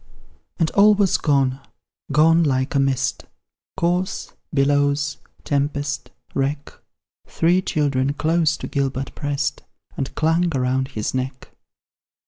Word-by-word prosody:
And 165 -2 +1
all 210 +1 +6
was 200 -2 +2
gone 135 -3 +1 0.5
gone 165 +4 +5
like 130 -2 0
a 140 - +2
mist, 135 -1 0 0.5
Corse, 180 +3 -1 0.2
billows, 145 +1 +1 0.3
tempest, 145 +1 -2 0.2
wreck; 140 +1 -2 0.5
Three 175 +3 +2
children 140 -5 0
close 160 +1 +1
to - - -6
Gilbert 135 -1 -2
prest 145 +1 -2 0.3
And 135 - -4
clung 165 0 +1
around 130 +1 0
his 110 -6 -4
neck. 130 0 -4
145 Hz, 110 wpm, -22 LUFS, 135-160 Hz, 0.5 s, all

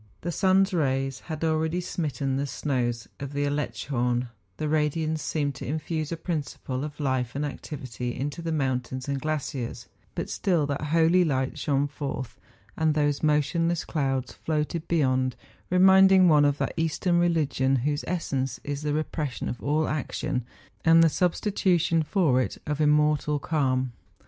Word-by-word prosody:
The 175 - -2
sun's 190 +2 +3
rays 135 -4 0
had 155 -1 -6
already 160 +1 +1
smitten 145 -6 -2
the 140 +1 -1
snows 120 -5 -2
of 140 0 -6
the 145 0 0
Aletschhorn, 125 -4 -1 0.3
the 155 - -2
radiance 155 +1 0
seemed 145 -3 -1
to - - -6
infuse 155 +2 -3
a 165 - -2
principle 145 -5 -4
of 150 0 -7
life 130 -4 -1
and 145 +1 -1
activity 130 -4 -5
into 145 +5 -3
the 165 0 -3
mountains 130 -3 -2
and 140 -1 -2
glaciers; 145 -5 -3 0.3
but - - -3
still 170 -6 +1
that 145 +1 -2
holy 165 +3 +4
light 130 -5 -1
shone 140 -1 +1
forth, 140 -3 -5 0.4
and 155 -1 +1
those 145 -1 +1
motionless 160 +3 +1
clouds 135 -4 -1
floated 155 +1 -2
beyond, 130 -6 +1 0.3
reminding 190 0 +6
one 150 -3 +6
of 145 0 +2
that - - -2
Eastern 170 +2 +1
religion 150 -6 +2
whose 145 0 0
essence 135 -7 -2
is 145 0 -4
the 150 -1 -1
repression 155 -4 -3
of 120 - -5
all 150 +2 +1
action, 135 -3 -2 0.4
and 165 0 +6
the 165 - +5
sub¬ 175 +2 +1
stitution 175 -5 +2
for 150 -7 +2
it - - -3
of 150 0 -2
immortal 150 0 +3
calm. 130 -4 0
150 Hz, 155 wpm, -26 LUFS, 135-160 Hz, 0.4 s, reminding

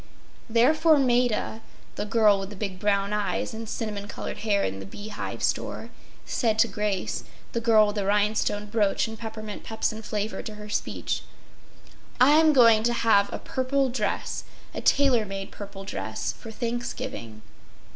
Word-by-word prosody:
Therefore 305 +7 +5
Maida—the 245 -5 -1
girl 210 -2 +4
with 195 0 -5
the 205 - -9
big 190 -2 -4
brown 200 0 +1
eyes 205 -2 -1
and 225 0 -6
cinnamon 210 -3 -4
colored - - -6
hair 205 -2 +1
in 95 +1 -2
the 95 - -7
Bee 205 - -8
Hive 205 - -5
Store—said 225 -4 -2
to 230 +1 +5
Grace—the 210 +2 -3
girl 220 -2 +6
with 205 0 -3
the 200 - 0
rhinestone 210 0 +1
brooch 210 0 +1
and 220 - -6
peppermint 220 -2 -7
pepsin 220 0 -2
flavor 210 0 -3
to 215 - -7
her 210 0 -9
speech—“I’m 295 +7 0
going 230 -6 +6
to 240 +2 +1
have 220 -4 +3
a - - -3
purple 265 +1 0
dress—a 230 -4 -4
tailor 270 -5 +4
made 195 -1 -6
purple 200 -1 -8
dress—for 215 +3 -4
Thanksgiving. 235 - -5
215 Hz, 140 wpm, -26 LUFS, 205-235 Hz, -, girl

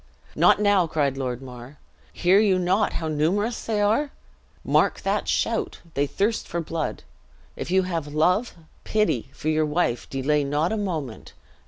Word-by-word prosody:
"Not - - +5
now!" 205 -4 +3
cried 145 -4 0
Lord 130 -1 -4
Mar. 125 +2 -11 0.3
"Hear 185 +3 +3
you 200 -3 +3
not 185 +4 +1
how 160 - -3
numerous 180 +10 0
they 220 -2 -1
are? 225 +8 +2 0.6
Mark - - +2
that - - -1
shout! - - -1
they 145 +1 0
thirst 210 +9 -1
for 170 - -3
blood. 165 -1 -4 0.5
If - - -6
you 190 +1 +3
have 165 -4 -3
love, 180 +10 +1 0.3
pity, 210 - 0
for 155 - -4
your 155 0 +2
wife, 150 -6 -1
delay 145 +2 +1
not 145 +5 0
a - - 0
moment. 160 - -4
165 Hz, 160 wpm, -24 LUFS, 145-200 Hz, 0.6 s, Not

